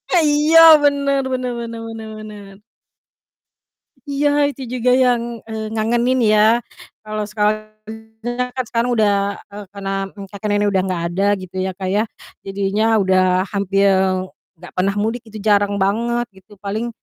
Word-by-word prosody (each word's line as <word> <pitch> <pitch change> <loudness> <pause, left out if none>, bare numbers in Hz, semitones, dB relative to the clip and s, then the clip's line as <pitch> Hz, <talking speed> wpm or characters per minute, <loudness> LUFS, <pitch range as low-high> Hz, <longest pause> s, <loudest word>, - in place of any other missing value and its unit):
Eh, 335 - +4
iya 300 +2 +4 0.2
bener 280 -1 +2
bener 255 -1 -2
bener 230 -1 -6
bener 225 -1 -8
bener. 205 -2 -11 1.5
Iya 285 +1 +1 0.2
itu 275 -2 -8
juga 250 0 +1
yang, 240 -2 0
eee, 220 -1 -5
ngangenin 240 +3 +1
ya. 215 0 +5 0.6
Kalau 215 0 -4
sekarang 215 0 -1 0.9
kan 255 - -1
sekarang 235 +1 0
udah 210 -2 +3 0.4
eee, 205 0 -8
karena 195 -1 -5 0.4
kakek 205 +1 -5
nenek 205 0 +1
udah 190 - +3
enggak 180 -3 -2
ada 195 +3 -1
gitu 185 0 -11
ya, 190 0 -2
Kak, 190 -1 -4
ya 210 +2 +2 0.4
jadinya 195 +2 -1 0.2
udah 185 0 +2
hampir 195 0 +2 0.7
enggak - - -13
pernah 195 +2 +1
mudik 225 +3 -1
gitu, 215 0 -9
jarang 205 -1 +2
banget 235 +4 0
gitu, 195 +2 -19
paling, 215 +4 -4
215 Hz, 145 wpm, -19 LUFS, 200-240 Hz, 1.5 s, ya